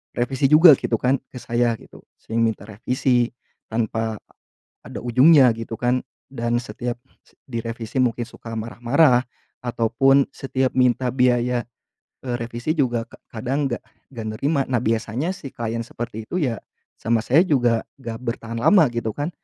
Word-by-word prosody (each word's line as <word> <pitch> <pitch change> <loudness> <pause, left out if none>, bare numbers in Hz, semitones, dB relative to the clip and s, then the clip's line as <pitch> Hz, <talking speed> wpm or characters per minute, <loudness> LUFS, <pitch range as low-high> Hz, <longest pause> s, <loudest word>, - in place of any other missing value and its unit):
revisi 130 +2 +1
juga 155 0 +9
gitu 115 -3 -1
kan 130 +1 +2
ke 125 - -9
saya 120 0 0
gitu, - - -15 0.2
sering 115 +1 -2
minta 110 -3 -1
revisi 120 +3 0 0.4
tanpa 110 -1 -1 0.7
ada - - -7
ujungnya 130 +3 +6
gitu 115 0 -6
kan, 125 +1 +1 0.3
dan 120 -2 -1
setiap 120 +2 -5 0.3
se - - -26 0.2
direvisi 115 +1 -4
mungkin 120 -2 +1
suka 115 0 -9
marah-marah, 120 +4 +2 0.4
ataupun 125 +3 +3
setiap 130 -1 -1
minta 125 0 +3
biaya, 125 -1 +1 0.6
eee, 125 - -2
revisi 120 +6 -2
juga 120 -7 0
ka - - -18
kadang 135 +5 -2
enggak 120 - -3 0.3
enggak 115 -3 -5
nerima. 140 +1 +1
Nah, 125 -3 0
biasanya 115 - -1
si 135 - -9
klien 115 0 -3
seperti 115 -2 -6
itu 180 +8 -2
ya, 120 -6 0 0.4
sama 115 0 +2
saya 145 +7 +5
juga 120 -7 +2 0.2
enggak 115 -3 -6
bertahan 115 -1 -4
lama 185 - +6
gitu 115 -1 -2
kan, 145 +8 -3
120 Hz, 150 wpm, -22 LUFS, 115-130 Hz, 0.7 s, juga